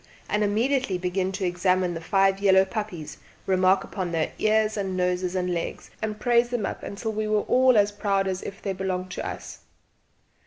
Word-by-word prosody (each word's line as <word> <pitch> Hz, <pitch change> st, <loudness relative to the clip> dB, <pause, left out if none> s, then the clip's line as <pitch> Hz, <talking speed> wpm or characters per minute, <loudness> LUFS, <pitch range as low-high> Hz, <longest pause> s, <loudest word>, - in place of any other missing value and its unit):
and 210 Hz, 0 st, +1 dB
immediately 225 Hz, 0 st, +1 dB
begin 185 Hz, +1 st, -1 dB
to 195 Hz, 0 st, -3 dB
examine 180 Hz, 0 st, +1 dB
the 165 Hz, -, -5 dB
five 195 Hz, +2 st, +2 dB
yellow 190 Hz, -1 st, +5 dB
puppies, 190 Hz, -7 st, -5 dB, 0.3 s
remark 185 Hz, 0 st, +3 dB
upon 185 Hz, -3 st, -4 dB
their 160 Hz, -2 st, 0 dB
ears 215 Hz, 0 st, +2 dB
and 195 Hz, -3 st, -2 dB
noses 180 Hz, 0 st, 0 dB
and 180 Hz, -1 st, 0 dB
legs, 170 Hz, -, -4 dB
and 215 Hz, -1 st, -3 dB
praise 240 Hz, +1 st, +3 dB
them 240 Hz, -4 st, -1 dB
up -, -, -4 dB
until 220 Hz, +3 st, -4 dB
we 215 Hz, 0 st, -2 dB
were 215 Hz, 0 st, +2 dB
all 255 Hz, 0 st, +4 dB
as 205 Hz, 0 st, +4 dB
proud 200 Hz, -2 st, 0 dB
as 185 Hz, -1 st, -2 dB
if 200 Hz, +1 st, -8 dB
they 195 Hz, -, -1 dB
had 190 Hz, -, -6 dB
belonged 185 Hz, -1 st, -2 dB
to -, -, -4 dB
us. -, -, -7 dB
195 Hz, 195 wpm, -25 LUFS, 185-215 Hz, 0.3 s, yellow